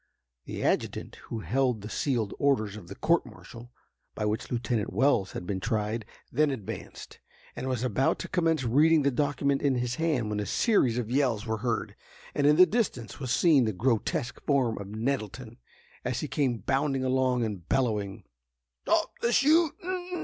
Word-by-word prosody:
The -, -, -5 dB
adjutant -, -, -1 dB
who 115 Hz, -, -4 dB
held 125 Hz, -3 st, 0 dB
the 105 Hz, -, -7 dB
sealed 120 Hz, -8 st, -1 dB
orders 110 Hz, -8 st, +1 dB
of 100 Hz, -5 st, -10 dB
the 100 Hz, -, -8 dB
court 170 Hz, +8 st, +2 dB
martial 120 Hz, +1 st, -12 dB, 0.4 s
by 105 Hz, -, -2 dB
which 105 Hz, +1 st, -2 dB
Lieutenant 120 Hz, -3 st, -1 dB
Wells 110 Hz, -3 st, +2 dB
had -, -, -5 dB
been 95 Hz, +1 st, -2 dB
tried, 110 Hz, +1 st, -2 dB, 0.3 s
then 150 Hz, +4 st, +3 dB
advanced, 125 Hz, -8 st, -7 dB, 0.4 s
and 130 Hz, -, -4 dB
was 125 Hz, -2 st, -1 dB
about 130 Hz, +2 st, +1 dB
to -, -, -6 dB
commence 165 Hz, -4 st, +1 dB
reading 150 Hz, +6 st, +4 dB
the 140 Hz, -, +3 dB
document 140 Hz, 0 st, 0 dB
in 140 Hz, -2 st, +2 dB
his 125 Hz, 0 st, -2 dB
hand, 145 Hz, -10 st, 0 dB
when 105 Hz, -, -1 dB
a 105 Hz, -, -3 dB
series 135 Hz, -, +2 dB
of 120 Hz, -2 st, -3 dB
yells 125 Hz, -5 st, +1 dB
were 110 Hz, -1 st, -1 dB
heard, 115 Hz, 0 st, -2 dB, 0.4 s
and 145 Hz, -, +2 dB
in 150 Hz, -, +6 dB
the 185 Hz, +3 st, +8 dB
distance 180 Hz, -, -2 dB
was 130 Hz, -3 st, -4 dB
seen 145 Hz, 0 st, +4 dB
the 110 Hz, -, -1 dB
grotesque 120 Hz, -, -1 dB
form 130 Hz, -7 st, +2 dB
of 100 Hz, -, -7 dB
Nettleton, 110 Hz, +1 st, -4 dB, 0.4 s
as 125 Hz, -2 st, -2 dB
he 150 Hz, -, -3 dB
came 135 Hz, -3 st, 0 dB
bounding 135 Hz, +4 st, 0 dB
along 130 Hz, -2 st, +1 dB
and 100 Hz, -6 st, -6 dB
bellowing: 105 Hz, -5 st, 0 dB, 0.6 s
"Stop -, -, +2 dB
the 235 Hz, -, +2 dB
shootin'! 345 Hz, +5 st, +2 dB
125 Hz, 175 wpm, -28 LUFS, 110-145 Hz, 0.6 s, the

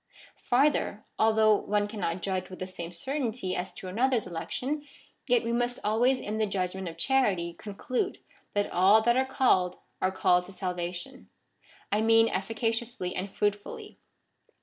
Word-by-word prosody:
Farther, 255 Hz, -4 st, +1 dB
although 220 Hz, -1 st, +5 dB
one 205 Hz, 0 st, 0 dB
cannot 185 Hz, -5 st, -3 dB
judge 185 Hz, -1 st, -2 dB
with 185 Hz, -, -9 dB
the 185 Hz, -, -4 dB
same 175 Hz, -2 st, -7 dB
certainty 230 Hz, -, -2 dB
as 180 Hz, +1 st, -3 dB
to 185 Hz, -, -8 dB
another's 235 Hz, +4 st, +1 dB
election, 250 Hz, -, -3 dB, 0.4 s
yet 245 Hz, -2 st, +3 dB
we 230 Hz, 0 st, -1 dB
must 245 Hz, +1 st, 0 dB
always 245 Hz, +5 st, +3 dB
in 215 Hz, +1 st, -4 dB
the 215 Hz, -, +2 dB
judgment 190 Hz, -1 st, -2 dB
of 165 Hz, -, -11 dB
charity 190 Hz, -7 st, +1 dB
conclude 230 Hz, -, -3 dB, 0.4 s
that 205 Hz, 0 st, 0 dB
all 195 Hz, +5 st, +5 dB
that 240 Hz, +1 st, +4 dB
are 260 Hz, +1 st, +2 dB
called 185 Hz, -9 st, +2 dB, 0.2 s
are 185 Hz, -, +2 dB
called 180 Hz, -1 st, +2 dB
to 195 Hz, -, -11 dB
salvation; 180 Hz, -2 st, -4 dB, 0.6 s
I 210 Hz, +2 st, +2 dB
mean 225 Hz, 0 st, +5 dB
efficaciously 225 Hz, 0 st, -2 dB
and 190 Hz, +2 st, -4 dB
fruitfully. 205 Hz, 0 st, -3 dB
210 Hz, 150 wpm, -28 LUFS, 185-240 Hz, 0.6 s, although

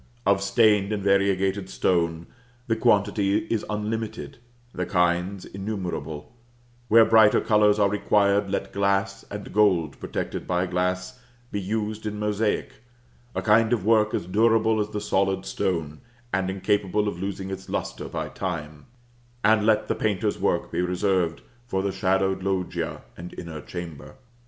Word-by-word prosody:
Of 100 Hz, -1 st, +3 dB
stained 105 Hz, -1 st, +3 dB
and 105 Hz, -2 st, -2 dB
variegated 100 Hz, -1 st, +1 dB
stone, 85 Hz, -3 st, 0 dB, 0.4 s
the 115 Hz, -, +1 dB
quantity 100 Hz, -3 st, +2 dB, 0.2 s
is 110 Hz, -, -1 dB
unlimited, 110 Hz, +4 st, -4 dB, 0.3 s
the -, -, -3 dB
kinds 90 Hz, +1 st, 0 dB
innumerable; 95 Hz, -4 st, -5 dB, 0.5 s
where 115 Hz, 0 st, +7 dB
brighter 110 Hz, -1 st, +6 dB
colors 105 Hz, -2 st, +3 dB
are 100 Hz, -1 st, +4 dB
required, 100 Hz, 0 st, +2 dB
let 100 Hz, -, -2 dB
glass, 100 Hz, 0 st, 0 dB
and 105 Hz, 0 st, -7 dB
gold 90 Hz, -8 st, +2 dB
protected -, -, -4 dB
by 90 Hz, 0 st, +1 dB
glass, 90 Hz, +5 st, -2 dB, 0.3 s
be 100 Hz, -, -2 dB
used 110 Hz, +2 st, -3 dB
in 105 Hz, 0 st, -4 dB
mosaic 105 Hz, +5 st, -1 dB, 0.6 s
a -, -, -2 dB
kind 110 Hz, +1 st, +4 dB
of 105 Hz, -5 st, -1 dB
work 110 Hz, -1 st, +3 dB
as -, -, -2 dB
durable 110 Hz, +3 st, +3 dB
as 105 Hz, 0 st, -1 dB
the 105 Hz, -1 st, -3 dB
solid 95 Hz, -2 st, 0 dB
stone, 80 Hz, -7 st, -2 dB, 0.3 s
and 95 Hz, -1 st, 0 dB
incapable 105 Hz, +1 st, 0 dB
of 90 Hz, -4 st, -3 dB
losing 95 Hz, 0 st, -4 dB
its 95 Hz, 0 st, -7 dB
lustre -, -, -4 dB
by -, -, -4 dB
time 80 Hz, -5 st, -5 dB, 0.6 s
and 110 Hz, 0 st, +4 dB
let 110 Hz, -1 st, +3 dB
the -, -, +1 dB
painter's 105 Hz, -4 st, -1 dB
work -, -, 0 dB
be -, -, 0 dB
reserved 90 Hz, -1 st, 0 dB, 0.2 s
for 95 Hz, -5 st, -1 dB
the 100 Hz, -, 0 dB
shadowed 95 Hz, 0 st, +1 dB
loggia 95 Hz, -2 st, -2 dB
and 90 Hz, +1 st, -9 dB
inner 80 Hz, -3 st, -7 dB
chamber. 85 Hz, 0 st, -8 dB
100 Hz, 145 wpm, -25 LUFS, 90-105 Hz, 0.6 s, where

